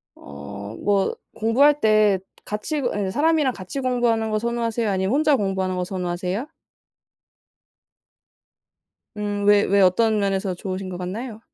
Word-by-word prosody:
어 70 +7 -10 0.2
뭐 200 -1 +1 0.2
공부할 280 +7 +3
때 215 -3 +4 0.3
같이 245 +8 -3
그 245 - 0 0.2
예 190 - -3
사람이랑 305 -1 +2
같이 190 +8 -6
공부하는 240 -3 +1
거 215 - +1
선호하세요 235 -1 -1
아니면 190 +1 0
혼자 300 0 +4
공부하는 190 -4 -1
거 180 - -1
선호하세요? 180 +5 -3 2.7
음. 205 -1 -2
왜 205 0 +6
왜 200 0 +3
어떤 215 +4 +3
면에서 195 -2 0
좋으신 185 +1 -5
것 180 -1 -6
같나요? 215 +5 -5
210 Hz, 290 characters per minute, -23 LUFS, 190-235 Hz, 2.7 s, 왜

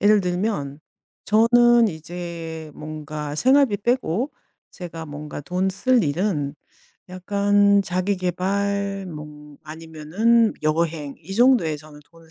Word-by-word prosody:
예를 210 0 +5
들면 180 -6 -2 0.4
저는 235 +2 +5
이제 165 -1 -7
뭔가 150 -1 -6
생활비 260 - +4
빼고 240 - -1 0.4
제가 165 -2 -8
뭔가 150 0 -7
돈 180 +6 -1
쓸 240 +5 +2
일은 150 -2 -1 0.5
약간 200 +2 +2
자기 185 +2 -1
계발 195 +2 -1
뭐 150 -3 -10
아니면은 165 +9 +1
여행 155 -2 -1
이 175 +5 -8
정도에 235 -10 +4
저는 150 0 -14
돈을 165 -1 -19
180 Hz, 215 characters per minute, -23 LUFS, 155-205 Hz, 0.5 s, 예를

